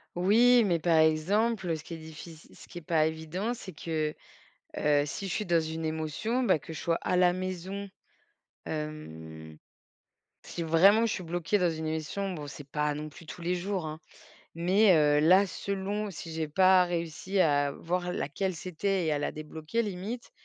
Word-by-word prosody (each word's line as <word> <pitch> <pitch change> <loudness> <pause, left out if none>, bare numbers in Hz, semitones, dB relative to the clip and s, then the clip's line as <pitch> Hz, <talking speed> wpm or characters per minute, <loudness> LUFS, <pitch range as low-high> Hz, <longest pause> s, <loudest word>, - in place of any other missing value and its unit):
Oui, 230 +6 +5
mais 175 -4 +2
par 165 0 +3
exemple, 185 +7 +2
heu, 165 - 0
ce 150 - -12
qui - - -8
est - - -5
diffic 160 +1 -10 0.2
ce - - -15
qui 175 - -8
est - - -16
pas 160 -2 +2
évident, 160 +8 -3
c'est 225 -5 -9
que, 155 -2 -2 0.7
heu, 145 -1 +3
si 195 +7 -5
je - - -3
suis 210 - -1
dans 170 -3 +3
une 160 0 -4
émotion, 160 - -1
bah, 190 -9 +3
que 165 - -10
je 160 - -6
sois 165 -1 +1
à - - +1
la 180 -1 +4
maison, 185 +2 -5 0.8
hem, 80 - -7 0.9
si - - -6
vraiment 190 +8 +5
je 225 - 0
suis 185 - -4
bloquée 175 +4 0
dans 180 -3 +2
une 160 0 -4
émission 160 +5 -3
bon 150 -4 -6
c'est 145 0 -10
pas 150 0 0
non 150 +1 -5
plus 165 +3 -13
tous 165 - -9
les 175 +2 0
jours, 185 -1 -2
hein, 155 +1 -7 0.5
mais, 185 +3 +4
heu, 150 -1 +4
là 185 +6 +6
selon, 200 +2 -3
si 165 -2 -8
j'ai 160 -1 -2
pas 185 +3 +5
réussi 175 +3 -3
à 145 -4 +3
voir 180 +1 -2
laquelle 185 +3 -2
c'était 185 +2 -1
et 155 - +1
à 150 - 0
la 145 - -1
débloquer 155 +8 -3
limite 210 +4 -5
170 Hz, 190 wpm, -29 LUFS, 155-190 Hz, 0.9 s, là